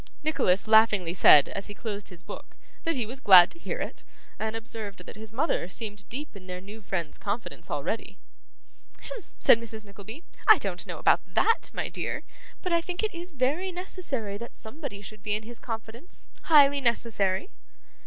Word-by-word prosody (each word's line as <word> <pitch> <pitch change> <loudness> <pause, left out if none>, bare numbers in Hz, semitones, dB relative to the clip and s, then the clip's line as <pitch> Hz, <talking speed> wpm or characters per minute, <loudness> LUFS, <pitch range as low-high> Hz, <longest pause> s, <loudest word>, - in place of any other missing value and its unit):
Nicholas 200 -12 +2
laughingly 215 -6 +5
said, 150 -5 +7
as 195 - -5
he 205 - -9
closed 210 -2 -5
his 180 -1 -9
book, - - -10 0.3
that 330 -1 +1
he 245 -4 -1
was 250 +5 -7
glad 185 -7 +9
to 335 - -12
hear - - -4
it, - - -5 0.4
and 220 +1 -2
observed 225 -3 -7
that - - -10
his 215 0 -10
mother 255 - 0
seemed 205 +1 -7
deep 275 0 -6
in 185 -2 -12
their 180 0 -5
new 205 +4 -11
friend's 175 -6 -4
confidence 210 +3 -4
already. - - -3 0.8
'Hem!' - - -7 0.2
said 230 - +6
Mrs. 220 -2 -7
Nickleby. 210 - -10 0.2
'I - - +10
don't - - -4
know - - -5
about - - +4
that, 455 - +2
my - - -2
dear, - - -4 0.4
but 365 -2 -1
I 335 - +3
think 355 +3 -4
it 435 - -1
is 345 +1 -7
very 305 +6 0
necessary 290 - -3
that 235 - -8
somebody 220 -3 -6
should 215 0 -8
be 210 0 -1
in 215 - -4
his 235 +1 -8
confidence; 225 +6 -8 0.2
highly 285 -3 +6
necessary. 230 - 0
225 Hz, 185 wpm, -27 LUFS, 200-285 Hz, 0.8 s, I